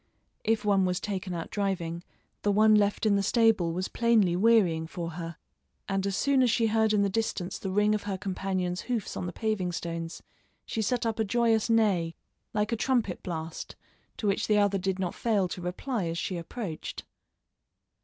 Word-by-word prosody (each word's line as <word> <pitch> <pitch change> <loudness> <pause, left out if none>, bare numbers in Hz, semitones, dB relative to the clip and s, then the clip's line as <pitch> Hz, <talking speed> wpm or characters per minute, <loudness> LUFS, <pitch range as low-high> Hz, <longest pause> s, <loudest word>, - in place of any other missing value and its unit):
If 220 -1 +1
one 200 -2 +4
was 180 0 0
taken 190 -2 -3
out 165 - -5
driving, 175 -4 -2 0.4
the 205 - +2
one 215 +2 +5
left 205 0 +3
in 205 -2 +4
the - - +2
stable 215 -5 +3
was 185 +3 -2
plainly 225 -7 +3
wearying 185 -6 +3
for 170 0 -5
her, 165 0 -6 0.5
and 195 0 0
as 195 0 -1
soon 275 +2 +3
as 250 - +4
she 230 +1 +2
heard 220 0 +2
in 210 -1 +3
the - - +3
distance 195 -3 -2
the 195 - -4
ring 210 +2 +3
of 210 - 0
her 195 - -1
companion's 185 -2 -2
hoofs 235 -5 -3
on 180 - -3
the - - -3
paving 215 -4 -1
stones, 165 -1 -5 0.4
she 225 - -2
set 240 +2 0
up 225 -1 -1
a - - +3
joyous 225 +1 +2
neigh, 195 -8 +2 0.4
like 210 +1 0
a - - +2
trumpet 230 -5 0
blast, 160 -2 -5 0.4
to - - -4
which 200 -1 +1
the 210 - +3
other 200 -1 +3
did 190 0 -1
not 185 -2 -2
fail 210 -5 +1
to 180 - -5
reply 185 +5 -2
as 165 0 -3
she 185 - -2
approached. 170 0 -6
200 Hz, 195 wpm, -28 LUFS, 180-220 Hz, 0.5 s, one